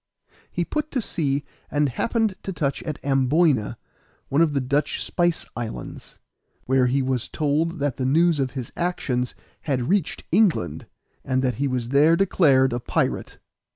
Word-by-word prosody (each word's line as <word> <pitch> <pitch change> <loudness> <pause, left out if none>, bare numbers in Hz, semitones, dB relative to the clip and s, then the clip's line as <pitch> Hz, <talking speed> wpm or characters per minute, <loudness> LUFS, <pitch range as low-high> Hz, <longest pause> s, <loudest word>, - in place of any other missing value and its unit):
He 175 - -1
put 305 - -2
to 270 - -1
sea 145 - -1 0.3
and 145 0 +2
happened 220 - 0
to 195 - -4
touch 145 -6 -2
at 155 -3 -4
Amboyna, 135 -4 +2 0.5
one 140 +4 +3
of 160 -3 +3
the 140 - +1
Dutch 140 +3 0
spice 175 -1 0
islands, 110 - -6 0.5
where 130 -1 +3
he 135 +2 +1
was 130 -2 -1
told 155 +3 0
that 140 -3 -1
the 130 - -1
news 165 +2 +3
of 135 -1 +1
his 130 -4 -5
actions 130 -8 -1 0.3
had 125 -2 0
reached 195 -4 0
England, 160 - +2 0.4
and 130 0 0
that 125 -4 0
he 140 - +2
was 125 -3 -2
there 150 +5 +5
declared 140 -9 +3
a 120 - -1
pirate. 120 - -2
140 Hz, 160 wpm, -24 LUFS, 130-165 Hz, 0.5 s, there